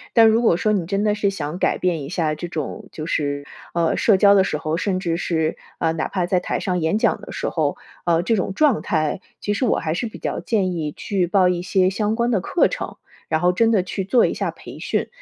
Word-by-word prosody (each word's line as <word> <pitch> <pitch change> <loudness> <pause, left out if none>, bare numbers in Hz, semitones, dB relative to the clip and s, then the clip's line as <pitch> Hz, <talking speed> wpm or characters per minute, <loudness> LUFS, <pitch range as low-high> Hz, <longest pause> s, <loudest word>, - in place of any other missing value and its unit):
但 225 -2 +8
如 220 +1 +4
果 220 -8 +3
说 215 +4 +1
你 175 -5 -1
真 195 +1 0
的 210 -1 +2
是 205 -1 +1
想 170 -2 -4
改 - - +1
变 175 -4 0
一 140 - -6
下 165 -4 0
这 165 +3 -5
种， 155 -4 -5
就 155 - -6
是， 145 -3 -1 0.3
呃， 170 -1 +2
社 210 -4 +4
交 200 +1 +6
的 195 - +5
时 170 - -1
候， 155 +1 -2
甚 185 +1 -1
至 170 -3 -1
是， 160 -2 -1 0.2
呃， 160 -1 +1
哪 160 -1 -2
怕 185 -3 -1
在 180 +1 +1
台 - - -2
上 180 -2 -1
演 160 +6 +1
讲 - - +1
的 - - -9
时 - - -3
候， - - -1 0.3
呃， 170 0 +2
这 225 +3 +2
种 190 0 -2
状 290 -3 +3
态， 155 +3 -1 0.2
其 205 - -1
实 210 - 0
我 230 - +2
还 155 -1 -1
是 235 +8 -2
比 220 - -9
较 - - -3
建 195 -5 0
议 155 -3 -3
去 190 -3 -1
报 185 0 +4
一 175 -1 0
些 185 0 +2
相 210 +2 0
关 235 +1 +1
的 205 -6 +1
课 340 - +2
程， - - -5 0.3
然 155 0 +1
后 180 0 +4
真 225 +5 +2
的 205 - +3
去 195 +1 -3
做 240 +5 +4
一 - - 0
下 - - -2
培 - - -11
训， - - -1
185 Hz, 275 characters per minute, -22 LUFS, 165-205 Hz, 0.3 s, 但